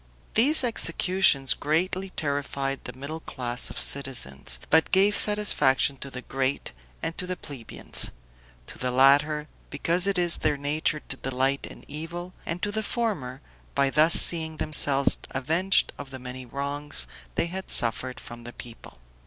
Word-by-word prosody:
These 270 +7 +3
executions 180 - +4
greatly 180 +5 -1
terrified 140 -3 -3
the 125 - -4
middle 140 +5 -7
class 125 -5 -3
of - - -9
citizens, 95 - 0
but 160 +1 +4
gave 200 +2 +4
satisfaction 150 -10 +3
to 140 - -6
the 125 -1 -8
great 135 +1 -2 0.3
and 165 - -3
to 180 - -4
the 185 - -3
plebeians; 135 -9 -1 0.5
to - - -10
the 125 - -1
latter, 145 +4 +4 0.2
because 175 +3 0
it 200 -1 +1
is 175 -1 +3
their 150 -2 +1
nature 150 +1 -1
to 135 - -7
delight 135 +1 -1
in - - -12
evil; 170 +4 -6
and 170 +1 -4
to 205 - 0
the 220 +1 -1
former, 195 - -2 0.3
by 140 -1 +2
thus 155 +3 +5
seeing 160 -2 +4
themselves 140 -3 +2
avenged 165 +9 +1
of 140 -1 -8
the 135 - -8
many 125 0 -8
wrongs 140 - -1 0.3
they - - +1
had 185 +3 -6
suffered 125 +2 +2
from 120 0 -10
the 120 +1 -9
people. 115 - -10
145 Hz, 155 wpm, -26 LUFS, 135-175 Hz, 0.5 s, thus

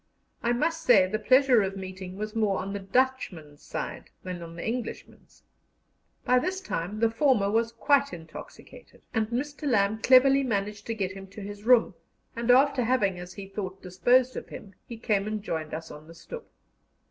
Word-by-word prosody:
I 235 - +1
must 320 +7 0
say 205 -7 +6
the 210 +4 -2
pleasure 255 +1 +5
of 195 0 -3
meeting 190 -1 -7
was 215 +1 -5
more 210 -3 +1
on 195 +1 -4
the 200 - -3
Dutchman's 195 - -1
side - - -6
than 180 -1 -6
on 165 0 -9
the 170 - -5
Englishman's. 235 0 -6 0.8
By 250 0 +4
this 370 +8 -2
time 210 - -4
the 230 - +4
former 225 -5 +2
was 225 +1 +1
quite 280 +4 +2
intoxicated, 160 -2 -12
and 220 -2 +1
Mr. 290 +6 -4
Lamb 215 -2 +2
cleverly 270 +2 +6
managed 210 -4 -2
to 230 - -2
get 195 -3 -2
him 195 0 -9
to 200 +2 -11
his 205 +1 -8
room, 245 -1 +5 0.4
and 235 +1 -3
after 265 +1 +5
having, 210 -7 +1
as 180 +1 -9
he 200 -1 -8
thought, 195 -1 -6
disposed 245 +8 +2
of - - -7
him, 195 - -10
he 235 - -8
came 210 -2 0
and 215 -1 -3
joined 160 -5 -4
us 160 +1 -6
on 150 +1 -12
the 165 - -13
stoep. 475 - -9
215 Hz, 185 wpm, -27 LUFS, 190-250 Hz, 0.8 s, say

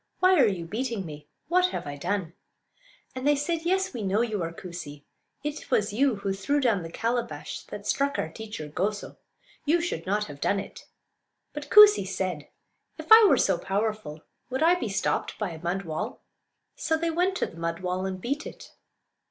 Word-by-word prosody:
Why 370 -2 +5
are 250 - +6
you 185 -5 -2
beating 225 +1 -3
me? 150 -2 -9 0.2
What 365 +3 +4
have - - -5
I 145 0 -5
done?" 175 +2 -2 0.8
And 255 +2 -3
they 295 - +5
said: 325 +3 -2
"Yes, 380 +1 +1
we 240 - -4
know 200 +2 +1
you 220 -5 -1
are 165 0 -2
Koosee; 165 -5 -9 0.4
it 295 0 -5
was 205 0 +1
you 265 +2 +2
who 200 -1 -2
threw 195 +10 0
down 230 -8 +2
the 165 - -7
calabash 235 +4 -3
that - - -8
struck 280 0 0
our - - -1
teacher 210 -4 -7
Goso. 200 +7 -3 0.5
You 315 +3 +3
should 260 - -3
not 205 +2 +1
have 145 -6 -9
done 200 - +1
it." 195 - -9 0.7
But 295 -1 -7
Koosee 420 - +8
said, 185 -6 -3 0.5
"If - - -10
I 445 -1 +10
were - - +5
so 190 -3 +2
powerful 205 -6 -2 0.3
would 260 +4 -1
I 335 +2 +6
be 355 -11 -2
stopped 195 0 -1
by 210 -5 -2
a 160 -1 -9
mud 180 +3 -2
wall?" 155 -3 -5 0.5
So 320 - 0
they 335 +1 -1
went 360 +3 +1
to - - +1
the 165 - -11
mud 170 +1 -3
wall 185 +1 -2
and 185 -1 -4
beat 280 +9 -3
it. - - -11
210 Hz, 195 wpm, -27 LUFS, 180-290 Hz, 0.8 s, I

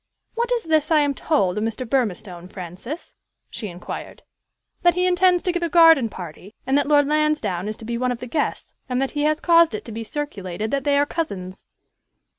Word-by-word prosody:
"What 475 +1 -1
is 480 -2 +1
this 315 -2 +1
I 310 -2 +5
am 285 -1 +1
told 210 - 0
of - - -2
Mr. 225 +3 -3
Burmistone, 195 -8 -2
Francis?" 185 - -6 0.4
she 215 - -5
inquired. 175 -1 -8 0.6
"That 350 -1 +4
he 360 0 +1
intends 360 0 +3
to 360 - +1
give 350 0 -2
a 340 - -1
garden 325 -8 +6
party, 180 +3 -10
and 265 +1 +1
that 285 -1 +2
Lord 290 -1 +4
Lansdowne 300 - 0
is 215 - -4
to 225 - -10
be 235 +1 -3
one 250 0 +1
of 245 - -2
the 250 - -7
guests, 295 +5 -2 0.2
and 250 0 0
that 270 0 -1
he 295 -1 -1
has 305 +1 +2
caused 335 -7 +4
it - - -7
to 230 - -8
be 225 +1 -5
circulated 215 -7 -4
that 275 -1 -1
they 285 -1 +3
are 285 - +4
cousins." 195 - -5
275 Hz, 215 wpm, -22 LUFS, 210-315 Hz, 0.6 s, garden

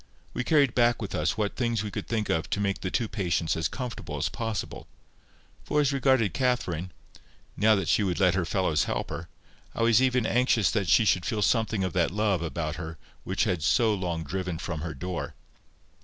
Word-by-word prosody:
We 125 - -2
carried 140 -3 +3
back 120 -1 +3
with 105 -3 -5
us 75 +7 0
what 105 -2 -1
things 115 -4 0
we 105 - -5
could - - -5
think 110 -2 -1
of 80 +1 -1
to - - -1
make 100 -1 -1
the 95 - -2
two 115 +3 0
patients 90 -6 -1
as 80 -1 0
comfortable 125 +2 -6
as - - 0
possible; 110 -4 -4 0.8
for, 150 - 0
as 145 -1 +2
regarded 130 -6 +2
Catherine, 95 - -1 0.6
now 110 +2 +4
that 95 -5 -2
she 105 - +3
would 95 -4 -1
let 90 -3 +4
her 95 -1 0
fellows 85 -4 +1
help - - -3
her, 85 +1 -6 0.5
I 115 - 0
was 115 +1 +5
even 125 -2 +2
anxious 120 -3 +2
that 100 -5 0
she 110 - +5
should 90 -3 +3
feel 105 -2 0
something 110 -2 +1
of 95 - -2
that 85 -2 +2
love 105 -3 0
about 85 -1 -3
her 80 -1 -6 0.3
which - - -2
she - - +2
had 90 -3 -1
so 110 +8 +3
long 90 -4 -2
driven 90 +1 -3
from 85 -2 -4
her 80 -1 -5
door. 90 +5 -5
100 Hz, 210 wpm, -27 LUFS, 85-115 Hz, 0.8 s, was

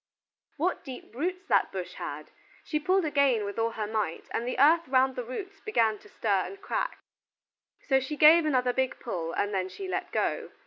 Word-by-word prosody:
What 350 +5 -1
deep 260 -4 -9
roots 365 +8 -3
that - - +3
bush - - -5
had! - - -7 0.3
She 305 - -1
pulled 370 +4 +2
again 280 -7 +2
with 200 +2 -5
all 225 0 +2
her 220 -2 -4
might, 210 -6 -2
and 235 - -2
the 250 - -2
earth 320 +5 +5
round 260 0 +3
the 250 - -3
roots 380 - -7
began 225 - +1
to - - -18
stir 200 -3 +1
and 395 - -10
crack, - - -2 0.9
so 265 -2 +4
she 295 +3 -5
gave 320 +3 +8
another 250 -4 +2
big 260 0 -1
pull, 170 -9 -4
and 205 0 -1
then 190 -1 -1
she 385 - -7
let - - -3
go. - - -1
260 Hz, 195 wpm, -28 LUFS, 225-320 Hz, 0.9 s, gave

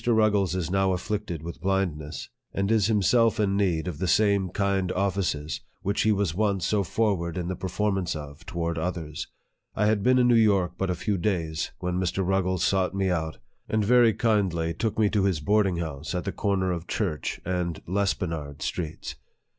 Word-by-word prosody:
Ruggles 105 -5 +3
is 90 -2 -2
now 95 -1 +2
afflicted 95 -3 -3
with 85 +1 -7
blindness, 90 -6 -2 0.3
and 100 +2 0
is 110 -3 +3
himself 115 +2 +3
in 100 -2 +2
need 90 -5 +1
of 80 -5 -4
the 95 - -1
same 100 0 +3
kind 95 -1 0
offices 90 -6 -1 0.2
which 100 +2 0
he 110 - +3
was 100 -5 +1
once 100 -2 0
so 105 0 +2
forward 95 -3 0
in 90 -1 -2
the 95 - -2
performance 95 -1 -1
of 75 +1 -8
toward 85 -1 -2
others. 80 -3 -4 0.5
I 105 - +2
had 105 -1 +2
been 125 +5 +4
in 125 -1 +4
New 120 - +5
York 100 -6 +4
but 95 +1 -2
a 90 - 0
few 95 +3 -1
days, 85 -5 -1
when 90 0 -2
Mr. 95 +1 0
Ruggles 95 -2 +1
sought 95 -1 +1
me 95 -1 +1
out, 80 -2 -2 0.3
and 110 -1 +1
very 120 0 +6
kindly 95 -7 +1
took 110 +5 -2
me 110 -2 +4
to 100 -3 +2
his 95 -6 +1
boarding 100 +3 +2
house 80 0 -4
at 90 - -1
the 100 - -2
corner 95 -3 0
of 85 -1 -4
Church 90 -9 -2
and 90 -3 -2
Lespenard 85 -6 -2
Streets. 80 -3 -4
95 Hz, 185 wpm, -26 LUFS, 85-100 Hz, 0.5 s, very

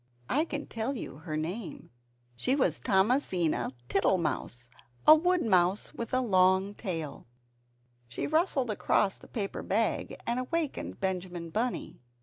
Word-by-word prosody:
(I 300 +4 +2
can 295 -3 -4
tell 230 +5 -3
you 140 - -6
her 155 0 -5
name, 170 - -5 0.4
she 255 - +1
was 280 - +1
called 190 -4 +3
Thomasina 180 - +1 0.2
Tittle 195 +2 +3
mouse, 125 -7 -3 0.4
a 310 - +11
woodmouse 225 - +2
with 230 - -5
a 255 - +2
long 190 -2 +3
tail.) 165 - -5 0.8
She 120 - -4
rustled 300 - +1
across 200 -1 +1
the - - -15
paper 205 -5 -3
bag, 220 +3 0
and 240 +1 0
awakened 300 +3 -3
Benjamin 180 -3 -3
Bunny. 230 - -2
200 Hz, 135 wpm, -30 LUFS, 175-255 Hz, 0.8 s, a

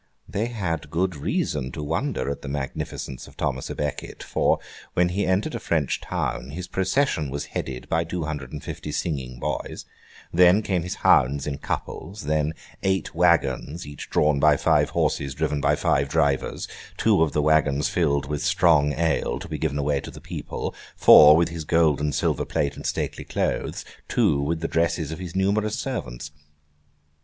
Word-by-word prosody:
They 110 +4 -1
had 85 -10 -3
good 90 +3 0
reason 65 -2 -2
to 75 - -5
wonder 75 - -1
at 70 - -5
the - - -8
magnificence 70 -1 -5
of - - -17
Thomas - - -2
à - - -5
Becket, 75 -1 -4
for, - - +2 0.4
when 90 0 +3
he 100 +3 -1
entered 95 +11 +1
a - - -3
French 75 -5 0
town, 65 - -3
his 90 +5 -6
procession 95 - 0
was 70 +2 -4
headed 65 -1 -4
by 80 0 +1
two 85 +1 -4
hundred 75 -1 -5
and - - -7
fifty 75 - -6
singing 65 -6 -3
boys; - - -4 0.5
then, 90 +4 +6
came 95 -4 0
his 90 +2 -4
hounds 70 +3 +4
in 70 -2 -3
couples; 100 +6 -5
then, 75 +1 0 0.3
eight 95 0 0
waggons, 85 -3 +1
each 70 -1 -9
drawn 75 -2 +2
by 75 0 +5
five - - +3
horses 70 -1 0
driven 75 -1 -1
by - - +3
five 70 0 +1
drivers: 70 -4 0 0.3
two - - +3
of 80 -3 +2
the 75 - +2
waggons 75 -2 +3
filled 70 -5 +1
with 75 0 -3
strong 85 -6 +4
ale 80 -6 0
to - - -8
be 75 - -5
given 70 -2 -1
away 70 -1 +1
to - - -8
the - - -10
people; - - -5 0.2
four, 75 +1 +9
with 85 0 +2
his 85 -1 -5
gold 80 -2 +3
and 75 -1 0
silver - - +1
plate 70 0 -1
and - - -5
stately - - -2
clothes; - - -2 0.2
two, 70 - +2
with 80 +3 -1
the 85 - -1
dresses 80 -2 0
of 80 - -5
his 90 -2 -7
numerous 100 +3 +1
servants. 60 +5 -4
75 Hz, 180 wpm, -24 LUFS, 70-85 Hz, 0.5 s, four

